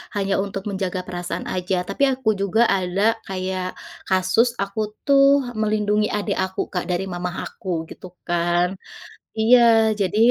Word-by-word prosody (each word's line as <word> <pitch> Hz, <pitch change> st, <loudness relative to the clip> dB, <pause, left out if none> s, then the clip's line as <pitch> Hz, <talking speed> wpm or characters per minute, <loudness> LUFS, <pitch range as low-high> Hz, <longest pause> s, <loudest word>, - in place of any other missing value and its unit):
hanya 195 Hz, -1 st, 0 dB
untuk 195 Hz, 0 st, -6 dB
menjaga 190 Hz, -2 st, -2 dB
perasaan 175 Hz, 0 st, -5 dB
saja 180 Hz, 0 st, -2 dB
tapi 280 Hz, -, -1 dB
aku 255 Hz, -4 st, -1 dB
juga 200 Hz, +4 st, +2 dB
ada 195 Hz, +4 st, +1 dB
kayak 185 Hz, -1 st, -4 dB, 0.3 s
kasus 190 Hz, +6 st, +3 dB
aku 200 Hz, +2 st, -3 dB, 0.3 s
tuh 275 Hz, -1 st, +5 dB
melindungi 210 Hz, -1 st, +1 dB
adik 205 Hz, -1 st, -1 dB
aku 190 Hz, 0 st, -3 dB
Kak 180 Hz, -2 st, -3 dB
dari 180 Hz, +2 st, -1 dB
mama 180 Hz, -1 st, -4 dB
aku 190 Hz, -, -8 dB, 0.2 s
gitu -, -, -10 dB, 0.2 s
kan. 175 Hz, 0 st, +1 dB, 0.7 s
iya, 235 Hz, +3 st, +6 dB, 0.4 s
jadi, 200 Hz, +2 st, 0 dB
195 Hz, 140 wpm, -22 LUFS, 185-215 Hz, 0.7 s, iya